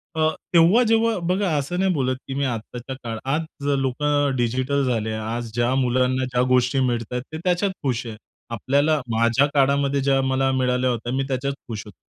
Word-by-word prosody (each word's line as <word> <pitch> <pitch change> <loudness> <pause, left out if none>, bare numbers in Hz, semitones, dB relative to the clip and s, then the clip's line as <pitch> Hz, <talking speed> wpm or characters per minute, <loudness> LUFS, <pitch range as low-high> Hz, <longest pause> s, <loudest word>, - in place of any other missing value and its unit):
अ, 155 0 +2 0.2
तेव्हा 170 +8 +6
जेव्हा 225 -1 +2
बघा 195 +1 +1
असं 160 +6 -2
नाही 190 0 +2
बोलत 130 -3 0
की 135 - -4
मी 140 +1 -1
आत्ताच्या 120 +2 -5
काळात. 115 -1 -4
आज 145 0 -3
लोकं 145 +1 0
डिजिटल 130 +3 0
झाले. 115 -3 -1
आज 110 +1 -4
ज्या 120 +2 +1
मुलांना 130 0 +1
ज्या 125 -1 0
गोष्टी 130 +1 +2
मिळतायेत 125 -1 -1
ते 155 - -3
त्याच्यात 185 +2 +1
खुश 125 -3 -1
आहेत. 110 -1 -7 0.4
आपल्याला, 145 +7 +1 0.2
माझ्या 115 +4 +3
काळामध्ये 140 0 +2
ज्या 135 0 +2
मला 135 0 +1
मिळाल्या 130 -1 +1
होत्या 120 0 -3
मी 135 +1 0
त्याच्यात 140 +1 -2
खुश 110 -3 -5
होतो. 105 - -13
130 Hz, 180 wpm, -23 LUFS, 125-145 Hz, 0.4 s, तेव्हा